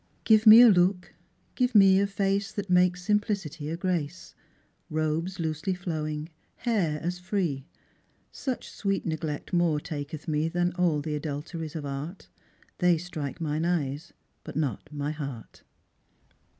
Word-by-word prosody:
Give 220 0 +4
me 220 +2 +11
a 245 - +9
look, 180 -2 +3 0.4
give 250 -2 0
me 195 -2 +7
a 200 - +2
face, 200 +1 -1
That 200 -3 -5
makes 180 0 +3
simplicity 195 -7 -1
a 165 - -3
grace; 175 -2 -3 0.6
Robes 155 +4 -1
loosely 160 +3 -2
flowing, 155 -3 -4 0.3
hair 190 -11 0
as 180 +1 -2
free; 175 -7 -2 0.6
Such 260 -3 -4
sweet 195 -1 -2
neglect 155 -1 -4
more 170 -4 +2
taketh 150 -1 -6
me 155 0 +1
Than 175 +1 0
aU 170 -5 +1
the 150 +1 -4
adulteries 155 +2 -5
of 155 -2 -4
art; 140 +7 -6 0.5
They 180 -2 +4
strike 160 -4 -6
mine 155 -1 -1
eyes, 160 -2 -1 0.3
but 155 - -9
not 145 -1 -2
my 145 0 -3
heart." 140 -6 -7
165 Hz, 140 wpm, -27 LUFS, 150-185 Hz, 0.6 s, me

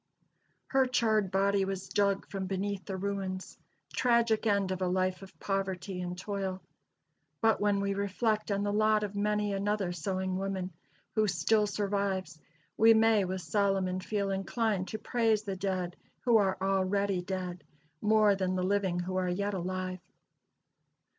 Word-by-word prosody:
Her 265 -1 +3
charred 220 -5 +2
body 195 +1 +2
was 190 0 -3
dug 200 -1 +1
from 195 -1 -4
beneath 195 +1 -2
the 190 -2 -4
ruins. 190 -1 -4 0.3
Tragic 235 -2 +2
end 200 -2 +2
of 185 0 -3
a 185 - +1
life 185 0 0
of 190 -1 -13
poverty 195 -1 -2
and 180 0 -4
toil! 195 -1 -3 0.8
But 225 -2 +3
when 205 -1 +2
we 200 0 0
reflect 210 +2 0
on 200 0 0
the 205 0 0
lot 215 0 +3
of 205 -1 -3
many 210 0 0
another 200 -1 0
sewing 185 +2 -2
woman, 190 -2 -3 0.4
who 215 -1 +2
still 210 +4 +2
survives, 195 -5 -2 0.4
we 225 +1 +7
may, 220 -2 +4
with 185 0 -3
Solomon, 195 -2 +1
feel 200 0 -2
inclined 195 0 -1
to 220 - -4
"praise 220 -1 +1
the 195 -2 -3
dead 185 -2 -2 0.3
who 240 -3 +4
are 195 -3 +2
already 195 0 +1
dead, 180 -1 -4 0.4
more 215 -1 +5
than 185 -1 -1
the 185 - 0
living 190 -2 +1
who 185 +1 -3
are 185 -1 0
yet 200 +3 -1
alive." 185 0 -3
195 Hz, 155 wpm, -30 LUFS, 185-210 Hz, 0.8 s, we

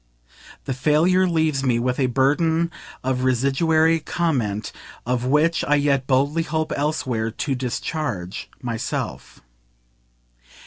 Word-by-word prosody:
The 135 - -2
failure 160 +8 +3
leaves 160 -5 +1
me 125 -3 +2
with 125 +2 -1
a 130 - +3
burden 160 +6 +2 0.3
of 130 0 -1
residuary 155 +6 +2
comment 130 -11 -1 0.3
of 125 0 -1
which 150 +5 +2
I 150 - +2
yet 140 -2 +1
boldly 140 +4 +2
hope 160 -1 -2
elsewhere 130 -7 -1
to 135 +5 -3
discharge 125 - -4
myself. 115 -2 -4
140 Hz, 115 wpm, -22 LUFS, 125-160 Hz, 0.3 s, failure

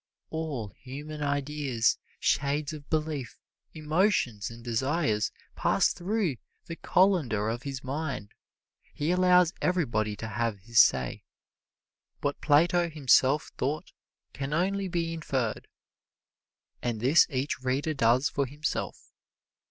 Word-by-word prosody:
All 150 -9 -3
human 145 +7 -8
ideas, 140 -4 0 0.2
shades 145 +2 0
of 145 -2 -10
belief, 155 -6 -2 0.4
emotions 155 - +1
and 115 0 -11
desires 120 -1 0 0.2
pass - - +2
through 185 - -1 0.3
the 165 - -6
colander 155 - +2
of 120 +2 -3
his 135 -2 -6
mind. 135 -6 -4 0.6
He 150 +3 0
allows 180 -1 +4
everybody 115 - 0
to 110 - -6
have 115 -2 -2
his 115 +3 +2
say. 65 -2 +4 1.0
What 145 0 -2
Plato 170 +4 +3
himself 145 -1 +3
thought 150 +4 -2 0.4
can 140 +1 -4
only 195 +3 0
be 170 -2 -2
inferred, 135 -8 -2 1.1
and 120 -3 -2
this 135 +8 +5
each 135 -2 -2
reader 135 +5 0
does 130 0 +3
for 140 -2 -1
himself. 145 +4 -4
145 Hz, 115 wpm, -28 LUFS, 120-160 Hz, 1.1 s, this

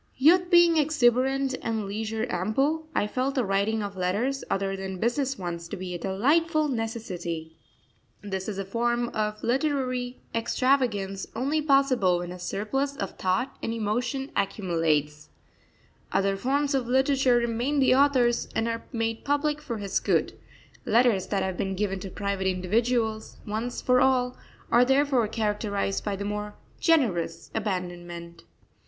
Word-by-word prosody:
Youth 345 +6 +5
being 345 -2 +6
exuberant 270 -2 +2
and 225 -2 -2
leisure 220 +2 -3
ample, 270 - 0
I - - +2
felt 260 +6 -1
the 255 -4 +1
writing 200 +3 0
of 200 -1 -5
letters 205 +10 -1
other 195 0 -1
than 190 -1 -5
business 260 +6 0
ones 170 -2 -5
to 205 - -6
be 185 -1 -5
a 175 - -4
delightful 300 - +2
necessity. 185 -9 -4 0.7
This 190 -1 -4
is 200 - -4
a 195 - -3
form 240 +3 0
of 215 -1 -3
literary 255 -1 -1
extravagance 230 -5 0
only 280 +6 0
possible 275 - +3
when 175 0 -5
a 180 - -8
surplus 270 +10 -2
of 195 - -3
thought 235 +9 -1
and - - -2
emotion 245 +5 -2
accumulates. 165 -7 0 0.8
Other 195 0 +1
forms 280 +7 0
of 260 -3 0
literature 265 0 +3
remain 240 +5 0
the 260 -1 +5
author's 260 -3 +3
and 225 - +1
are 230 0 -3
made 225 -2 -2
public 295 +1 0
for 240 -7 -4
his 200 -2 -1
good; - - +1 0.5
letters 230 -5 +3
that 195 -2 0
have 190 -1 -3
been 195 0 -2
given 195 -1 -1
to 190 - -6
private 200 0 -2
individuals 220 +4 0
once 225 +3 -3
for 250 0 +4
all, 255 -1 +2 0.4
are 240 +1 +6
therefore 265 -3 +3
characterised 210 -2 -1
by 205 -2 -2
the 200 +1 -5
more 210 0 -4 0.2
generous 210 - +1
abandonment. 175 -4 -5
225 Hz, 150 wpm, -26 LUFS, 195-265 Hz, 0.8 s, being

